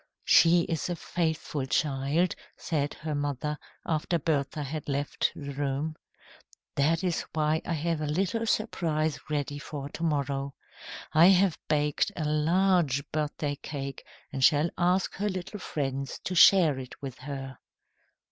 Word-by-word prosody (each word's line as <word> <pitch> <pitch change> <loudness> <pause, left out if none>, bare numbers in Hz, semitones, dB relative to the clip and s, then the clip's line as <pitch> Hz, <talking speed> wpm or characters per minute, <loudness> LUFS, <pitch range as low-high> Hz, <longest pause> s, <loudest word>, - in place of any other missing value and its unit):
"She 170 +1 +6
is 165 0 -2
a 175 - -1
faithful 160 -5 -2
child," 145 +5 +1 0.2
said 145 -3 -2
her 155 0 -4
mother, 145 +1 -2 0.3
after 160 +2 0
Bertha 145 -1 -1
had 145 +1 -5
left 140 +1 0
the 140 -1 -6
room. 145 +2 -2 0.8
"That 160 +5 +2
is 180 -3 0
why 155 0 +1
I - - 0
have 165 0 -1
a 150 - -1
little 195 +9 0
surprise 160 -9 0
ready 145 -1 -2
for 140 -1 -6
to 165 - -9
morrow. 140 -3 -1 0.6
I 160 +3 +7
have 190 -3 +4
baked 150 -1 +1
a 155 - -2
large 155 -2 +2
birthday 150 -1 -2
cake 140 -2 -6 0.3
and 135 -1 -2
shall 150 +3 +4
ask 180 +2 +1
her 205 +2 0
little 185 +2 -5
friends 135 -5 -3
to 185 - -3
share 170 -6 +6
it 130 -1 -9
with 135 -2 -6
her. 135 -1 -7
150 Hz, 145 wpm, -28 LUFS, 140-170 Hz, 0.8 s, I